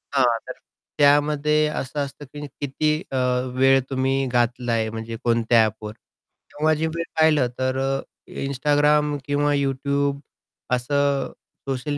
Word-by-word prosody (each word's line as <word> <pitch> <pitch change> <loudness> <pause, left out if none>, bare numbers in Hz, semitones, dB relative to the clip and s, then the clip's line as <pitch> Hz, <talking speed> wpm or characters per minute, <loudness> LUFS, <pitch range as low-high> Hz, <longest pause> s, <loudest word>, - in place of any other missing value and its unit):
हां, 135 -2 +5 0.2
तर - - -5 0.4
त्यामध्ये 150 +1 +3
असं 145 -1 -4
असतं 140 +1 -5
की 145 0 -6 0.2
किती 145 +2 0 0.2
अ, 135 - -1 0.4
वेळ 135 +1 +5
तुम्ही 135 0 0
घातला 120 0 0
आहे 110 -1 0
म्हणजे 115 +1 -6
कोणत्या 115 -1 +3
ॲपवर. 110 0 -5
तेव्हा 150 +6 -4
जे 160 +2 -1
वेळ 170 - -1 0.2
पाहिलं 155 -5 +4
तर 130 0 0
अ, 135 0 0 0.5
Instagram 145 +2 +2
किंवा 145 0 +1
YouTube 140 0 0 0.6
असं 140 +2 0 0.4
सोशल 140 +2 -2
140 Hz, 130 wpm, -23 LUFS, 130-145 Hz, 0.6 s, हां